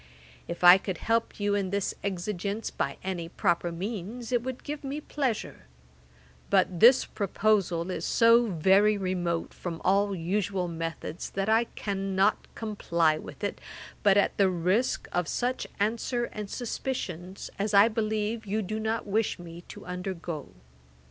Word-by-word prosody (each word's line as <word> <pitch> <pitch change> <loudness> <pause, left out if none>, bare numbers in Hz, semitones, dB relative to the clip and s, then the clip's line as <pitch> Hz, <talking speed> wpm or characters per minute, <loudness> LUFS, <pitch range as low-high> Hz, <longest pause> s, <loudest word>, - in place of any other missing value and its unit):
If 170 +1 -6
I 180 +2 +10
could 190 -2 -4
help 230 +3 0
you 205 0 +1
in 200 -2 0
this 200 0 -1
exigence 200 +2 -3
by 140 - -2
any 180 -3 -3
proper 175 -2 0
means, 215 +6 -5
it 245 -2 +2
would 260 +1 -6
give 295 0 -5
me 280 +2 -3
pleasure; 265 - -3 0.8
but 175 - +2
this 245 +6 +7
proposal 195 -4 0
is - - -4
so 230 0 +5
very 195 +4 +4
remote 180 -3 -2
from 170 -2 -5
all 200 +1 +3
usual 185 +1 -1
methods, 165 0 -5
that 195 +2 -2
I 225 +2 +4
cannot 195 0 0
comply 170 -8 +1
with - - -10
it, - - -3 0.4
but 200 -1 +5
at 200 - +3
the 195 -2 +4
risk 185 +7 0
of 175 -2 0
such 250 +1 -1
answer 235 +3 0
and 210 -2 -5
suspicions 195 - -4
as 205 +1 0
I 200 +2 +8
believe 220 0 -2
you 215 +2 0
do 215 +3 -3
not 220 +1 -1
wish 210 +2 0
me 170 -1 -10
to - - -10
undergo. 180 -4 -5
200 Hz, 150 wpm, -28 LUFS, 180-220 Hz, 0.8 s, I